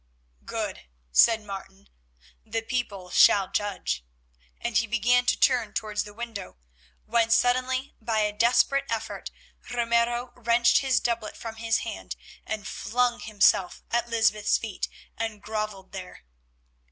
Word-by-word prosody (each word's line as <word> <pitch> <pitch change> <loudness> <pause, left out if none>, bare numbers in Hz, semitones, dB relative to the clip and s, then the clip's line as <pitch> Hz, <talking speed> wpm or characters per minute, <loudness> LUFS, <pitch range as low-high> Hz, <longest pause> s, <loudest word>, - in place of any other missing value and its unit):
"Good," 65 - -4 0.2
said 225 - +5
Martin, 195 -1 -9 0.6
"the 225 0 -3
people 205 -7 -3
shall 195 0 +5
judge," 205 - -2 0.6
and - - -3
he 230 - +3
began 245 +2 +2
to - - +2
turn 245 -5 +3
towards 210 -1 -2
the 210 - -11
window, 230 - -7 0.5
when 230 0 +2
suddenly, 255 +3 +2
by 220 -1 0
a 210 0 0
desperate 250 +5 +3
effort, 225 -1 -4 0.4
Ramiro 240 +1 +1
wrenched 235 0 +4
his 265 -3 +2
doublet 230 -3 -2
from 225 -1 -7
his 225 0 0
hand, - - -6 0.3
and 215 -2 -4
flung 245 +1 0
himself 200 -3 +2
at 235 0 0
Lysbeth's 220 -2 +2
feet 215 -5 -4 0.3
and 225 -2 -3
grovelled 210 -2 -4
there. 185 - -9
225 Hz, 130 wpm, -26 LUFS, 210-240 Hz, 0.6 s, said